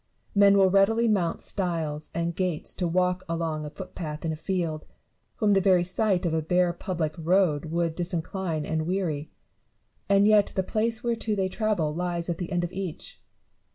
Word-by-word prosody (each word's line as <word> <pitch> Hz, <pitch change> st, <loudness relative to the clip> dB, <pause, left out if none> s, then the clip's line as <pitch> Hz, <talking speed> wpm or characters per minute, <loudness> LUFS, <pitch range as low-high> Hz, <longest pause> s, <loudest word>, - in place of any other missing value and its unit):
Many 200 Hz, -1 st, +6 dB
will 190 Hz, -1 st, +5 dB
readily 225 Hz, +4 st, +4 dB
mount 185 Hz, -6 st, 0 dB
stiles 160 Hz, -5 st, -2 dB
and 170 Hz, 0 st, -2 dB
gates 180 Hz, -5 st, -1 dB
to 180 Hz, -, -1 dB
walk 180 Hz, +1 st, +1 dB
along 165 Hz, -2 st, -2 dB
a -, -, -5 dB
footpath 155 Hz, -1 st, -7 dB
in 160 Hz, -, 0 dB
a -, -, -3 dB
field, 165 Hz, -2 st, -3 dB, 0.5 s
whom 210 Hz, -2 st, +2 dB
the 195 Hz, -1 st, +4 dB
very 185 Hz, -2 st, +4 dB
sight 185 Hz, 0 st, 0 dB
of 165 Hz, -, 0 dB
a 160 Hz, -, +1 dB
bare 180 Hz, +2 st, +2 dB
public 170 Hz, -6 st, -3 dB
road 165 Hz, -2 st, +2 dB
would 165 Hz, 0 st, -1 dB
disincline 175 Hz, -2 st, -3 dB
and 160 Hz, +1 st, -2 dB
weary; 170 Hz, -6 st, -2 dB, 0.8 s
and 200 Hz, 0 st, +5 dB
yet 210 Hz, -1 st, +5 dB
the 190 Hz, -, +1 dB
place 225 Hz, +3 st, -1 dB
whereto 230 Hz, -2 st, -1 dB
they 190 Hz, -2 st, 0 dB
travel 195 Hz, -8 st, 0 dB
lies 175 Hz, 0 st, -2 dB
at 170 Hz, -, -5 dB
the 180 Hz, 0 st, -4 dB
end 175 Hz, -1 st, 0 dB
of 175 Hz, +1 st, -4 dB
each. 185 Hz, -4 st, -6 dB
180 Hz, 180 wpm, -26 LUFS, 165-195 Hz, 0.8 s, Many